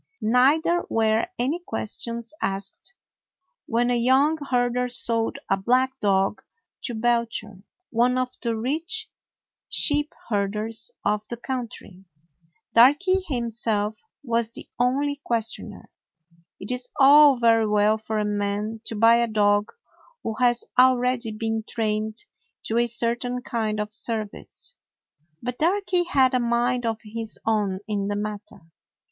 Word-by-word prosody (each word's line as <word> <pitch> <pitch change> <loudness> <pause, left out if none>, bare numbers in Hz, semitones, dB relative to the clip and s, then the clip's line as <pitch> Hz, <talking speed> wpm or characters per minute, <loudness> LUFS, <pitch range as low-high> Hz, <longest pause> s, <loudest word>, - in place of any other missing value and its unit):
Neither 285 +9 +3
were 220 +2 +2
any 275 +8 0
questions 235 -3 -5
asked 195 - -4 0.7
when 240 +1 +1
a - - +2
young 265 +6 +3
herder 245 0 +1
sold 230 0 +2
a 195 - +2
black 255 +6 +1
dog 195 0 +1 0.4
to 240 - -3
Belcher, 230 -3 -1 0.3
one 245 +2 +2
of 255 0 -1
the 230 -2 -1
rich 330 - -2 0.6
sheep 295 0 +3 0.2
herders 210 - -2 0.2
of 210 0 0
the 235 - -5
country. 235 -7 -6 0.7
Darky 295 +11 +5
himself 225 -5 -2 0.2
was 235 -3 0
the 230 - -10
only 280 +4 +1
questioner. 230 -1 -3 0.7
It 195 - -5
is 250 0 -1
all 285 0 +8
very 225 -2 +3
well 210 +1 +2
for 220 0 -4
a 210 - 0
man 210 +2 -2
to 225 - -4
buy 230 +2 +5
a 235 0 +2
dog 205 -1 +2 0.5
who 225 - -2
has 240 -1 +2 0.2
already 250 -2 +3
been 225 +1 -2
trained 215 0 -2 0.4
to 225 +1 0
a 240 - +2
certain 240 +2 -2
kind 220 -3 -2
of 210 0 -4
service. 220 -2 -4 0.7
But 250 0 -4
Darky 360 +1 +1
had 270 -6 +3
a 255 - +3
mind 240 0 0
of 225 -1 -1
his 225 +1 -5
own 205 -4 0
in 205 -2 -2
the 205 - -2
matter. 210 -1 -6
235 Hz, 130 wpm, -24 LUFS, 215-250 Hz, 0.7 s, all